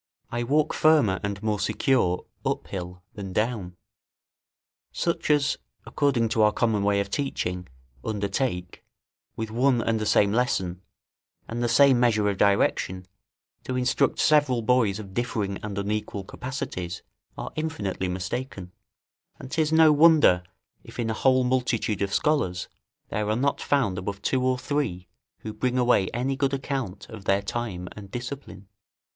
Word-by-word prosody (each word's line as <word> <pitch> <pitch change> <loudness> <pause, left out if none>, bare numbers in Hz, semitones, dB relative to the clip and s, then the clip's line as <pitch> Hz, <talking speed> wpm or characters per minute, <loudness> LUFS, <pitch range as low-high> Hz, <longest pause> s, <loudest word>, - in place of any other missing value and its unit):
I 120 - -1
walk 150 +5 +1
firmer 145 -12 +4
and 100 +1 -4
more 105 -1 0
secure 100 -3 +1 0.2
up - - -1
hill 90 -1 -7
than 95 -3 -7
down. 105 -6 -2 1.1
Such 170 -2 -2
as, 145 -2 +2 0.3
according 125 -6 +1
to 110 - +1
our 105 0 +5
common 110 -2 +1
way 100 0 +2
of 100 0 -3
teaching, 90 -10 -2 0.4
undertake, 100 -3 -2 0.5
with 110 -1 -4
one 125 +2 +3
and 115 -1 0
the 110 - -2
same 100 -1 +4
lesson, 95 -7 0 0.7
and 115 +1 -4
the 120 - +1
same 135 +1 +5
measure 110 -4 +3
of 100 - -3
direction, 95 -2 +2 0.6
to 130 - -3
instruct 125 0 +1
several 145 -6 +3
boys 110 -4 +2
of 100 -3 -9
differing 105 -5 -2
and 105 -2 -5
unequal 105 0 -2
capacities, 95 -7 -5 0.3
are - - -5
infinitely 110 -13 -2
mistaken; 95 +1 -4 0.7
and 130 - -10
'tis 155 -1 +1
no 160 -1 +6
wonder, 150 - +6 0.4
if - - -13
in 115 -2 -1
a - - 0
whole 130 +3 +3
multitude 125 -4 0
of 100 -1 0
scholars, 95 - 0 0.4
there 105 0 -2
are 110 - +2
not 140 +4 0
found 115 -11 +1
above 100 +2 -5
two 130 - +1
or 130 0 +2
three 125 -11 -2 0.3
who 110 - -6
bring 125 +4 -1
away 120 -7 +3
any 130 +3 -1
good 140 0 0
account 135 -8 -4
of 105 -4 -10
their 100 +2 +2
time 100 -5 -4
and 100 -2 -10
discipline. 120 -4 -7
110 Hz, 150 wpm, -26 LUFS, 100-130 Hz, 1.1 s, no